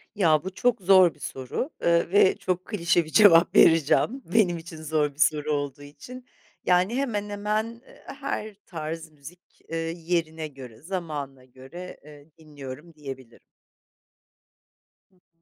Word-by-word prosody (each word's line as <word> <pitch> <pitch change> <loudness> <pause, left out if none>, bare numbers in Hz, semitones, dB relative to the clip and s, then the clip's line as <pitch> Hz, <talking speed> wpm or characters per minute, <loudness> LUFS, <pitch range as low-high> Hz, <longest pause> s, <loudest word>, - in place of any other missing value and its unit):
Ya 160 -7 +3
bu 190 0 -6
çok 240 +1 +1
zor 185 -2 +6
bir - - -25
soru, 135 - -4
ııı, 170 0 +2
ve 195 -1 +5
çok 185 0 -2
klişe 170 -5 +1
bir - - -11
cevap 180 -6 +6
vereceğim 165 - +4
benim 190 -6 +3
için 165 0 -10
zor 150 -1 0
bir 140 - -24
soru 150 0 +2
olduğu 145 -1 -3
için. 245 - -12 0.4
Yani, 180 +5 +2
hemen 220 -7 -2
hemen 215 +3 -3 0.2
her 220 -6 -5
tarz 160 -1 -6
müzik, 155 +5 -16
ııı, 165 - -2
yerine 165 -2 -2
göre, 130 -6 -12
zamanına 150 -7 -6
göre, 135 +8 -11
eee, 150 0 -15
dinliyorum 150 0 -10
diyebilirim. 135 -5 -10 1.7
Hı 190 - -33
hı. 165 -2 -39
165 Hz, 140 wpm, -25 LUFS, 150-190 Hz, 1.7 s, zor